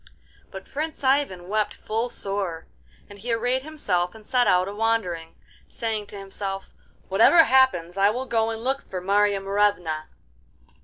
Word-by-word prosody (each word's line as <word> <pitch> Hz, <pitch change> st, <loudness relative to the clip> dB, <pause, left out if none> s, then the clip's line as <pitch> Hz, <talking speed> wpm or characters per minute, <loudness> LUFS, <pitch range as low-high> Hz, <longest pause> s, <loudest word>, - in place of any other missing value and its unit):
But 190 Hz, -1 st, -9 dB
Prince 310 Hz, +1 st, -5 dB
Ivan 260 Hz, -10 st, +1 dB
wept 210 Hz, +1 st, -1 dB
full 225 Hz, +3 st, -2 dB
sore, 195 Hz, -7 st, -3 dB, 0.4 s
and 205 Hz, -1 st, -13 dB
he 235 Hz, +4 st, -4 dB
arrayed 245 Hz, +3 st, 0 dB
himself 200 Hz, -, 0 dB
and 220 Hz, -1 st, -14 dB
set 245 Hz, +1 st, +2 dB
out 180 Hz, +1 st, +3 dB
a 200 Hz, -, -5 dB
wandering, 205 Hz, -7 st, -1 dB, 0.3 s
saying 220 Hz, -3 st, -3 dB
to 205 Hz, -, -9 dB
himself, 195 Hz, 0 st, -5 dB, 0.4 s
'Whatever 225 Hz, -, +6 dB
happens, 225 Hz, -, +3 dB
I 200 Hz, +1 st, +5 dB
will 250 Hz, +5 st, -2 dB
go 225 Hz, -3 st, +1 dB
and 225 Hz, 0 st, -5 dB
look 270 Hz, +2 st, 0 dB
for 185 Hz, -, -6 dB
Marya 200 Hz, +2 st, +2 dB
Morevna! 195 Hz, -6 st, 0 dB
205 Hz, 155 wpm, -24 LUFS, 190-240 Hz, 0.4 s, Whatever